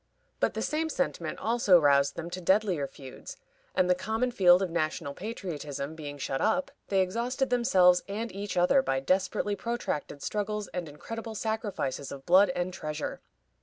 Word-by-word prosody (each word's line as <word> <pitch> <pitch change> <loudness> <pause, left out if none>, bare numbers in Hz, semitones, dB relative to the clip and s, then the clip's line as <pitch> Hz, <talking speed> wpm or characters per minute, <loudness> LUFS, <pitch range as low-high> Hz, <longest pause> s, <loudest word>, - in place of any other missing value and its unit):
But - - +1
the - - -1
same 320 +1 -1
sentiment 175 - -2
also 220 -6 +4
roused 140 -2 +3
them 170 +1 -6
to 185 +1 -5
deadlier 190 -5 +2
feuds, 135 -2 -11 0.4
and 185 - +3
the 180 - +5
common 220 +7 -1
field 185 -4 +5
of 180 - -3
national 155 -3 -2
patriotism 155 - -5
being 145 -2 -7
shut 135 -1 -2
up, 275 +5 +1 0.2
they 195 -1 +2
exhausted 245 +7 -1
themselves 185 -8 +5
and 215 +3 -4
each 200 0 -5
other 180 +11 +5
by 135 - 0
desperately 190 +6 0
protracted 215 -11 -4
struggles 210 -1 -2
and 175 -3 -5
incredible 225 +9 -7
sacrifices 205 - -3
of 135 -1 -8
blood 185 +3 +6
and 180 +1 -2
treasure. 155 -3 -5
185 Hz, 165 wpm, -29 LUFS, 155-220 Hz, 0.4 s, blood